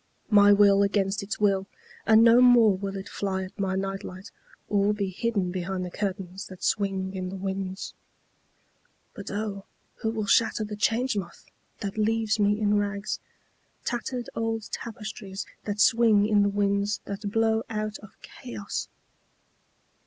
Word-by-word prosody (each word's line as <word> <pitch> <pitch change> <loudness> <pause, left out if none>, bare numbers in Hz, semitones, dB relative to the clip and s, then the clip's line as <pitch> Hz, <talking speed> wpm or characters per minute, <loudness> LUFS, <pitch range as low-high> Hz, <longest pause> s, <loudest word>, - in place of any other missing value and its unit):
My 205 -1 +7
will 200 -1 +6
against 200 0 +1
its 200 +1 -5
will, 195 -2 +2 0.4
and 220 0 +7
no 235 +1 +7
more 240 -5 +6
will 195 +1 -4
it 195 - -7
fly 190 -1 -2
at 185 +3 -11
my 190 -1 0
night 195 0 -3
light 185 +3 -9 0.4
or 205 0 +2
be 200 -2 -2
hidden 200 -2 -1
behind 185 0 -3
the 180 - -7
curtains 195 -1 -4
that 185 -1 -11
swing 195 -2 0
in 185 -1 -4
the 195 - -6
winds.(But 190 +1 -9
O 205 -1 -4 0.3
who 220 - -2
will 220 -2 -2
shatter 220 +2 +3
the 210 0 -5
Change 230 +4 +1
Moth 190 -4 -6 0.4
that 200 +1 -4
leaves 220 0 +1
me 205 +1 +3
in 210 -1 +2
rags—tattered 215 +4 -5
old 225 -1 -3
tapestries 210 -3 -6 0.2
that 205 0 -3
swing 225 -1 +5
in 210 -1 +4
the 200 - +3
winds 200 0 0
that 200 +1 -4
blow 225 0 +2
out 215 -1 -3
of 210 -2 -15
Chaos!) 225 -5 -6
205 Hz, 150 wpm, -27 LUFS, 195-220 Hz, 0.4 s, My